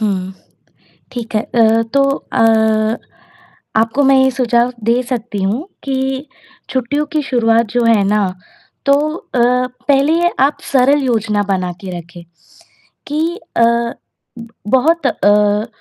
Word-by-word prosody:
हुँ, 190 -3 -2 0.8
ठीक 235 -3 -6
है। - - +2
अ, 225 -1 +2
तो 275 0 +4 0.3
अ, 220 0 +2 0.8
आपको 225 +5 +2
मैं 270 0 +5
ये 265 - +3
सुझाव 245 -1 +1
दे 235 +3 +2
सकती 235 -5 -4
हूँ 220 - -1 0.2
कि 265 +1 -2 0.4
छुट्टियों 265 +3 -1
की 305 -1 0
शुरुआत 230 -3 +2
जो 245 0 +1
है 225 -3 +4
ना 210 0 +2 0.6
तो 280 - +5 0.2
अ, 255 - -4 0.5
पहले 285 +4 +3 0.2
आप 285 - 0
सरल 280 +2 +4
योजना 220 -4 0
बना 185 -2 -1
के 185 -3 -6
रखें, 170 +1 -12 0.9
कि 320 +5 -2 0.2
अ, 230 - +5 1.1
बहुत 310 +4 +3
अ, 210 -2 +2
235 Hz, 125 wpm, -16 LUFS, 215-270 Hz, 1.1 s, मैं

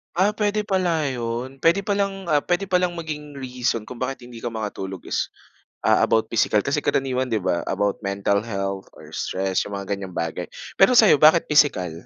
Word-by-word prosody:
Ah, 190 +3 +4
pwede 210 0 +1
pala 180 -7 0
yun, 125 +1 -4
puwede 165 +7 +3
pa 200 0 -1
lang, 195 -2 -2
ah, 150 -2 +2
puwede 175 +2 0
palang 180 -1 +2
maging 155 -3 -6
reason 125 -4 -3
kung 125 - -8
bakit 130 +2 -3
hindi 115 -2 -11
ka 120 - -2
makatulog 100 -4 -5
is, - - -2 0.5
ah, - - +4
about 110 -1 +2
physical 105 -2 +2
kasi 145 +2 0
karaniwan 130 -2 0
'di 110 -5 -1
ba, 85 - +1
about 100 +1 0
mental 100 0 0
health 100 -3 -4
or - - -14
stress, 95 0 -1
yung 100 - -5
mga 100 - -5
ganyang 95 -2 -5
bagay. 85 -1 -3 0.3
Pero 220 +6 +6
sa'yo 210 - +7
bakit 160 +2 +6
physical? 145 - +3
130 Hz, 190 wpm, -23 LUFS, 100-170 Hz, 0.5 s, sa'yo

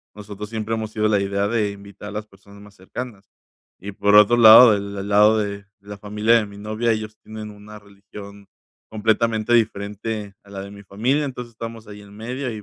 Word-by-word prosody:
nosotros 105 0 -9
siempre 110 0 -4
hemos 110 -1 -4
sido 110 0 0
la 105 -2 +2
idea 100 +1 -1
de 105 -2 0
invitar 100 0 -11
a - - -9
las 105 +1 -6
personas 100 0 -18
más 105 -1 -16
cercanas. 100 +1 -9 0.5
Y 100 +2 -7
por 100 +1 +1
otro 105 +3 +6
lado, 115 0 +9
el 100 0 -6
el 100 +1 -5
lado 105 +2 +5
de 100 -1 -4 0.2
la 100 0 -10
familia 105 +3 +1
de 110 - +2
mi 100 0 -13
novia, 110 +3 -1
ellos 110 0 -5
tienen 110 -1 -8
una 105 +1 -13
religión 100 0 -13 0.4
completamente 110 +1 0
diferente 105 -1 -2
a 100 - -18
la 100 -1 -7
de 100 - -9
mi 100 0 -12
familia. 125 +10 -1
Entonces, 125 -3 -7
estamos 115 -1 -8
ahí 105 0 -11
en 100 0 -16
medio 125 +3 -5
y 105 - -8
105 Hz, 205 wpm, -21 LUFS, 100-110 Hz, 0.5 s, lado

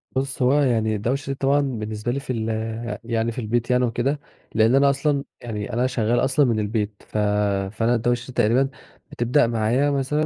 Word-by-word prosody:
بُصّ، 135 0 -2
هو 125 +2 +4
يعني 110 -5 +1
الدوشة 135 +6 -2
طبعًا 140 +1 +2
بالنسبة 110 -4 -3
لي 140 - -2
في 130 - -4
ال 115 -1 -2 0.5
يعني 115 0 -1
في 120 - -6
البيت 120 +2 -1
يعني 125 0 +3
وكده، 130 +5 -1 0.4
لأن 110 +4 +4
أنا 140 0 +5
أصلًا 140 0 0 0.2
يعني 105 -4 -5
أنا 125 +2 +2
شغّال 120 -2 +1
أصلًا 135 +2 +3
من 115 -4 +1
البيت 105 -1 -2
ف - - -5 0.5
فأنا 115 +2 +1
الدوشة 120 +2 0
دي 130 - -9
تقريبًا 125 +6 +2 0.4
بتبدأ 120 +2 +2
معايا 120 +5 +1
مثلًا 140 +3 0
120 Hz, 180 wpm, -23 LUFS, 110-135 Hz, 0.5 s, أنا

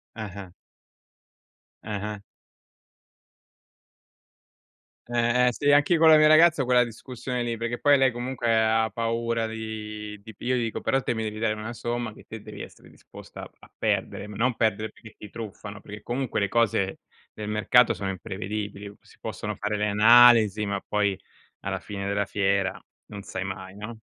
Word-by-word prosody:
Ah-ah. 100 -4 -8 1.3
Ah-ah. 105 0 -4 2.9
Eh, 120 +1 +2
eh - - 0
sì 145 +4 +2
anche 145 +4 +4
con 160 0 +5
la 155 - +9
mia 155 - +6
ragazza 155 -1 +6
ho - - -1
quella 125 -1 +4
discussione 125 +1 -5
lì, 120 -1 -2
perché 115 +1 -3
poi 145 -1 +5
lei 135 -2 +3
comunque 120 -1 -1
ha 110 0 +2
paura 115 +1 -1
di 105 -1 -6
di 110 +1 -12
pi - - -12
io 125 0 +2
gli 120 - 0
dico: 115 - -4
"Però 135 0 +1
te 120 - -1
mi 110 - -3
devi 110 -1 -4
dare 110 -1 0
una 110 +2 -6
somma 120 -1 -3
che - - -16
te 110 -1 -8
devi 105 -1 -10
essere - - -14
disposta - - -13
a - - -10
a - - -17
perdere", - - -1
ma 105 -1 -9
non 125 +2 +1
perdere 110 -1 0
perché 110 - -15
ti 105 - -11
truffano, 105 -2 -8
perché 105 0 -10
comunque 125 +1 -2
le 100 - +1
cose 100 -4 +1 0.3
del 105 -1 -7
mercato 115 +3 +4
sono 95 -1 -3
imprevedibili. 100 +1 -5
Si - - -22
possono - - -5
fare 105 +1 -2
le 105 0 0
analisi, 110 -1 +6
ma 100 -1 -2
poi 100 -2 0 0.4
alla - - -4
fine 100 -1 -6
della 100 0 0
fiera 95 -1 0 0.3
non 100 -1 -9
sai 95 -1 -5
mai, 95 0 -7
no? 110 +2 -8
110 Hz, 175 wpm, -26 LUFS, 105-120 Hz, 2.9 s, la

